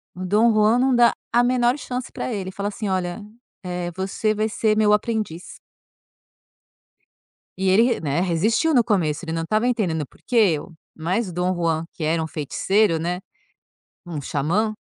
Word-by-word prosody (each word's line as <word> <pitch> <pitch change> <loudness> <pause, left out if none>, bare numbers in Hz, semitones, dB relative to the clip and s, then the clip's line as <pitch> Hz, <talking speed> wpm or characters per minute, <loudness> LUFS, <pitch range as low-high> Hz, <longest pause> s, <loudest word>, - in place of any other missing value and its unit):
o 185 - -5
Dom 215 +5 +4
Juan 215 +3 +4
não 260 -1 +3
dá 240 -1 +5 0.2
a 240 +1 +4
menor 245 +1 +2
chance 250 -3 -5
pra 255 - -4
ele, 190 -2 -4
fala 200 +2 -3
assim 210 -1 -4
olha: 185 +2 -2 0.4
"Eh, 180 -1 -4
você 195 +3 -1
vai 215 +1 0
ser 215 0 +1
meu 210 -1 +4
aprendiz". 210 -6 -2 2.0
E 190 0 +1
ele 195 +4 +5
re 245 - +1
né, 150 +1 -1
resistiu 215 - +1
no 245 -4 +5
começo, 175 -7 0
ele 160 - -4
não 165 0 -2
estava 215 +7 +1
entendendo 180 - 0
"por - - -24
que 250 - -4
eu?". 185 -7 +2 0.2
Mas 185 +6 -1
o 175 - -8
Dom 180 +1 0
Juan, 165 -1 0
que 160 - -6
era 160 +1 +1
um 160 - -4
feiticeiro, 165 +5 +1
né, 175 +2 -2 0.9
um 160 -4 -5
xamã, 175 - 0
190 Hz, 175 wpm, -22 LUFS, 170-220 Hz, 2.0 s, dá